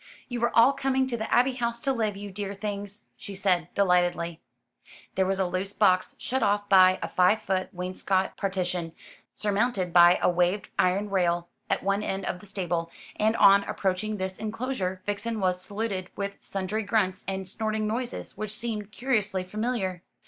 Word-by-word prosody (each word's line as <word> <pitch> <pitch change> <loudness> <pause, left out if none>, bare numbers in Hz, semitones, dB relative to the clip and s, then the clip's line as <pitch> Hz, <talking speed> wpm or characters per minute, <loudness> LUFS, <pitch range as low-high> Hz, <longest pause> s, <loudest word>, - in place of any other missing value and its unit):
"You 245 -2 -4
are 235 - -1
all 235 +4 +7
coming 265 -1 +1
to 255 -2 -3
the 220 -1 -4
Abbey 255 +2 +4
House 235 -1 -1
to 270 - +1
live, 215 -5 -1
you 205 0 -7
dear 200 +1 -4
things," 205 0 -5
she 200 - -8
said 185 -4 +1
delightedly. 175 -3 +1 0.7
There 190 -1 +1
was 195 0 0
a 190 - +1
loose 185 +2 -3
box, 185 -4 +2
shut 260 +1 -2
off 205 -1 +1
by 185 -1 +6
a - - -1
five 195 +4 +3
foot 190 -2 -1
wainscot 185 +1 -1
partition, 180 -4 -2 0.4
surmounted 205 -3 0
by 175 0 +7
a - - +2
waved 180 +3 +1
iron 195 +3 +2
rail, 175 -2 +1 0.2
at - - 0
one 200 +1 +1
end 195 -2 -3
of 180 - -3
the 205 - -12
stable, 175 -4 -2 0.3
and 220 +1 +2
on 200 -2 +6
approaching 195 +3 -1
this 190 0 -4
enclosure 215 -4 -3
Vixen 210 +2 -2
was 180 -2 0
saluted 200 -3 -3
with 200 0 -4
sundry 195 +3 -3
grunts 200 -3 0
and 190 -1 -3
snorting 215 +2 -1
noises, 240 +3 -3
which 215 0 -4
seemed 215 -3 -4
curiously 210 -6 0
familiar. 195 -2 -2
200 Hz, 175 wpm, -27 LUFS, 185-215 Hz, 0.7 s, all